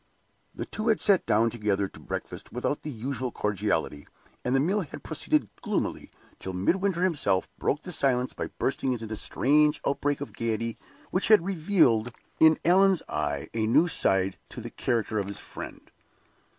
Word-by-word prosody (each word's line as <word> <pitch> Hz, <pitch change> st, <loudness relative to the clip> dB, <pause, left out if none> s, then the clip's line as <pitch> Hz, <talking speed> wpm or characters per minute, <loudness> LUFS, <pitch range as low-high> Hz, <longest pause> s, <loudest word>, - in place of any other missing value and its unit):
The -, -, -4 dB
two 215 Hz, +2 st, -4 dB
had 220 Hz, -2 st, +3 dB
sat 200 Hz, -3 st, +3 dB
down 115 Hz, +2 st, +3 dB
together 105 Hz, -3 st, 0 dB
to -, -, -15 dB
breakfast -, -, -6 dB
without 125 Hz, +4 st, -2 dB
the 150 Hz, -, -6 dB
usual 130 Hz, 0 st, -3 dB
cordiality, 95 Hz, -9 st, -1 dB, 0.4 s
and 125 Hz, +1 st, +1 dB
the -, -, +4 dB
meal 190 Hz, +9 st, +1 dB
had 160 Hz, -, -8 dB
proceeded -, -, 0 dB
gloomily, -, -, -2 dB, 0.3 s
till 95 Hz, -, -5 dB
Midwinter 180 Hz, -, +1 dB
himself 135 Hz, -, +1 dB
broke 145 Hz, -, 0 dB
the 180 Hz, -, -6 dB
silence 130 Hz, -5 st, +1 dB
by -, -, -4 dB
bursting 130 Hz, -1 st, -1 dB
into 115 Hz, -2 st, -5 dB
the 110 Hz, 0 st, -4 dB
strange 150 Hz, +7 st, +2 dB
outbreak 140 Hz, +1 st, 0 dB
of 145 Hz, -, -6 dB
gayety 115 Hz, 0 st, -2 dB, 0.4 s
which 185 Hz, -, +1 dB
had 215 Hz, -6 st, +6 dB
revealed 160 Hz, -, +2 dB, 0.3 s
in 160 Hz, -1 st, +7 dB
Allan's 190 Hz, +1 st, +5 dB
eyes -, -, -2 dB
a 110 Hz, -1 st, 0 dB
new 155 Hz, +10 st, +5 dB
side 95 Hz, -, +1 dB
to -, -, -8 dB
the -, -, -7 dB
character 110 Hz, -2 st, -1 dB
of 100 Hz, -, -2 dB
his 100 Hz, -, -6 dB
friend. -, -, -10 dB
130 Hz, 170 wpm, -27 LUFS, 110-170 Hz, 0.4 s, in